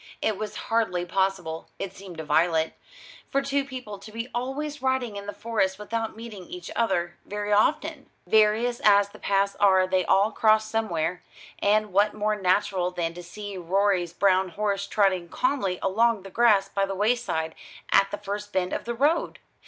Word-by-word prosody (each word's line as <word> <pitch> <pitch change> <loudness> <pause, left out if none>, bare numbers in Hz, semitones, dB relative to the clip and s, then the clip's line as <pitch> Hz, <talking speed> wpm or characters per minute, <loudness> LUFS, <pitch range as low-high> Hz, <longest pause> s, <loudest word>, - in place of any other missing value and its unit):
It 215 - 0
was 215 +2 -5 0.2
hardly 200 -6 +1
possible, 180 -3 -1
it 195 -2 -5
seemed 190 -3 -10
to 160 - -5
Violet, 160 +1 +2 0.6
for 275 - +1
two 275 0 0
people 250 -7 -8
to 215 +2 -12
be 230 +3 -5
always 280 +4 -3
riding 260 -4 0
in 200 0 -7
the - - -3
Forest 205 -4 -1
without 225 +2 -3
meeting 220 -5 -9
each 180 -1 -8
other 175 -7 0
very 205 0 -3
often. 300 +6 +1 0.2
Various 220 +4 +3
as 200 -1 +5
the - - -15
paths 200 0 +1
are 190 -2 +5
they 185 0 +1
all 200 +5 +3
cross 215 0 +3
somewhere: 180 -6 -1 0.4
and 210 -1 +2
what 205 +2 +3
more 215 0 0
natural 185 -1 +1
than 170 -2 -3
to 175 - -8
see 200 +3 -8
Rorie's 185 0 +1
brown 190 +1 +2
horse 200 +1 -2
trotting 190 -4 +1
calmly 200 -8 0
along 220 +1 +2
the 195 - -10
grass 215 -4 +4
by 195 0 -1
the 195 - -3
wayside, 205 -7 0 0.4
at 195 - +5
the 205 - -4
first 205 +1 -5
bend 185 -2 -1
of - - -3
the 235 0 -3
road? 295 +7 +1
205 Hz, 175 wpm, -26 LUFS, 185-225 Hz, 0.6 s, as